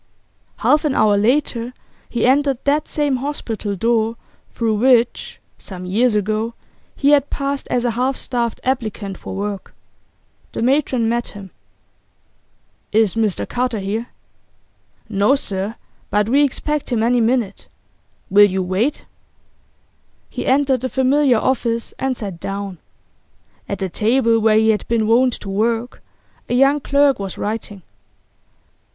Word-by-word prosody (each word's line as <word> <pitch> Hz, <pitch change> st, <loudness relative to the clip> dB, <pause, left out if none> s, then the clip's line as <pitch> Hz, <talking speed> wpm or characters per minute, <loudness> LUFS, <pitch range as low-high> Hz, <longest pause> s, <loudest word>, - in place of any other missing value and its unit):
Half 300 Hz, +1 st, +3 dB
an 295 Hz, -4 st, 0 dB
hour 215 Hz, -1 st, +4 dB
later 240 Hz, +2 st, 0 dB, 0.3 s
he 235 Hz, -, 0 dB
entered 275 Hz, +1 st, +3 dB
that 295 Hz, +2 st, +1 dB
same 290 Hz, -3 st, 0 dB
hospital 230 Hz, -7 st, -4 dB
door 225 Hz, +2 st, +1 dB, 0.4 s
through 225 Hz, -2 st, 0 dB
which, 240 Hz, 0 st, +2 dB, 0.2 s
some 185 Hz, -2 st, -8 dB
years 220 Hz, +5 st, +2 dB
ago, 215 Hz, +3 st, -1 dB, 0.4 s
he 285 Hz, +1 st, +2 dB
had 290 Hz, -1 st, +4 dB
passed 280 Hz, 0 st, -3 dB
as 245 Hz, 0 st, 0 dB
a 240 Hz, -, +2 dB
half 255 Hz, +4 st, 0 dB
starved 235 Hz, -3 st, -2 dB
applicant 220 Hz, -6 st, -2 dB
for 185 Hz, -, -8 dB
work. 200 Hz, -1 st, -5 dB, 0.8 s
The -, -, -2 dB
matron 260 Hz, -3 st, +2 dB
met 235 Hz, +1 st, 0 dB
him. 195 Hz, -3 st, -10 dB, 1.4 s
'Is 215 Hz, -3 st, +3 dB
Mr 220 Hz, -4 st, -1 dB
Carter 250 Hz, -2 st, -1 dB
here?' 210 Hz, +4 st, -3 dB, 1.0 s
'No, 210 Hz, +5 st, +3 dB
sir. 200 Hz, -5 st, -4 dB, 0.3 s
But 210 Hz, +1 st, +1 dB
we 280 Hz, +4 st, +4 dB
expect 295 Hz, +1 st, -2 dB
him 225 Hz, -2 st, +1 dB
any 240 Hz, +1 st, +3 dB
minute. 230 Hz, -3 st, 0 dB, 0.6 s
Will 205 Hz, +1 st, +7 dB
you 190 Hz, 0 st, -1 dB
wait?' 195 Hz, +11 st, -1 dB, 1.3 s
He -, -, -4 dB
entered 265 Hz, -2 st, +2 dB
the 260 Hz, -, -2 dB
familiar 265 Hz, -1 st, +3 dB
office, 230 Hz, -1 st, -1 dB
and 265 Hz, -2 st, -1 dB
sat 195 Hz, -6 st, -6 dB
down. 195 Hz, -1 st, -5 dB, 0.9 s
At 200 Hz, -, -2 dB
the 190 Hz, 0 st, -2 dB
table 230 Hz, +4 st, +2 dB
where 220 Hz, -1 st, +4 dB
he 220 Hz, 0 st, +4 dB
had 210 Hz, -, -2 dB
been 230 Hz, -2 st, +1 dB
wont 245 Hz, +3 st, +3 dB
to 200 Hz, -, -7 dB
work, 225 Hz, +4 st, -1 dB, 0.5 s
a 245 Hz, -, +1 dB
young 275 Hz, +3 st, +4 dB
clerk 280 Hz, -2 st, +2 dB
was 195 Hz, -2 st, -5 dB
writing. 205 Hz, -3 st, -4 dB
230 Hz, 140 wpm, -19 LUFS, 210-260 Hz, 1.4 s, Will